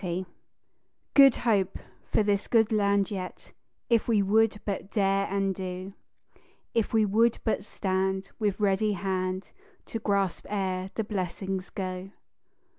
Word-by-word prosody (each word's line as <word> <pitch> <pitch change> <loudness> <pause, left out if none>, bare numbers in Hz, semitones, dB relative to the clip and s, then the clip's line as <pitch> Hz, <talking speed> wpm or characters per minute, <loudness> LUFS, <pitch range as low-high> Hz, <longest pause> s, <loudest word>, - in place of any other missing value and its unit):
_ 180 +1 -2 0.9
"Good 275 -3 +8
Hope" 200 -5 +1 0.3
for - - +3
this 205 -1 0
good 225 -2 +3
land 200 -1 +2
yet, 185 -2 -6 0.4
If 235 -2 +2
we 215 -4 +3
would 215 +1 +3
but 200 -1 -3
dare 195 -2 +1
and 195 -1 0
do; 185 +1 -6 0.8
If 230 -2 +1
we 220 -1 +4
would 225 +3 +3
but 220 - 0
stand 190 -1 -1
with 205 -2 0
ready 210 +1 +2
hand 185 0 -2 0.3
To 225 - -4
grasp 200 -4 0
ere 190 -2 -2
the 220 - 0
blessings 190 -1 -3
go. 185 0 -5
195 Hz, 135 wpm, -28 LUFS, 190-215 Hz, 0.9 s, Good